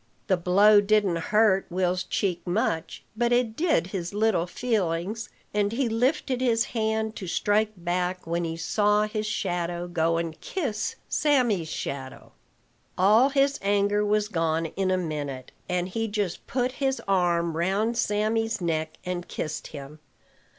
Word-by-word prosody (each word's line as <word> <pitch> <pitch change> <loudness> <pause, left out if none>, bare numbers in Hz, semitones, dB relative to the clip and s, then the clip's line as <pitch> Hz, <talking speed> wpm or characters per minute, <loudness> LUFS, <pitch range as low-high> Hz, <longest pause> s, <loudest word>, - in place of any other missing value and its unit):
The 190 - +3
blow 200 +4 +5
didn't 205 -4 +2
hurt 210 -3 +3
Will's 180 0 0
cheek 180 -1 -1
much, 175 -3 -1
but 240 +1 +1
it 240 -2 +2
did 315 - +2
his 180 0 -4
little 210 -5 +2
feelings; 205 0 -2 0.2
and 205 -1 +1
he 245 +2 0
lifted 255 +3 0
his 235 -2 +2
hand 220 -1 -1
to 190 - -6
strike 210 +4 +1
back, 180 +1 -2
when 170 +1 -1
he 165 -1 -3
saw 210 +4 +2
his 215 0 -2
shadow 175 -4 -2
go 165 -1 +1
and 165 -1 -4
kiss 250 - -3
Sammy's 240 - +2
shadow. 135 -4 -6 0.7
All 215 +8 +5
his 275 0 +2
anger 205 +1 +2
was 210 0 +1
gone 165 -4 0
in 190 -1 0
a 185 - +2
minute, 145 -6 -4 0.2
and 180 0 0
he 225 +4 -2
just 205 -4 -3
put 250 0 0
his 270 0 +1
arm 170 -3 +1
round 195 +7 0
Sammy's 225 +1 0
neck 160 -2 -2
and 180 -1 -3
kissed 155 -1 -4
him. 145 +1 -10
200 Hz, 150 wpm, -26 LUFS, 175-220 Hz, 0.7 s, blow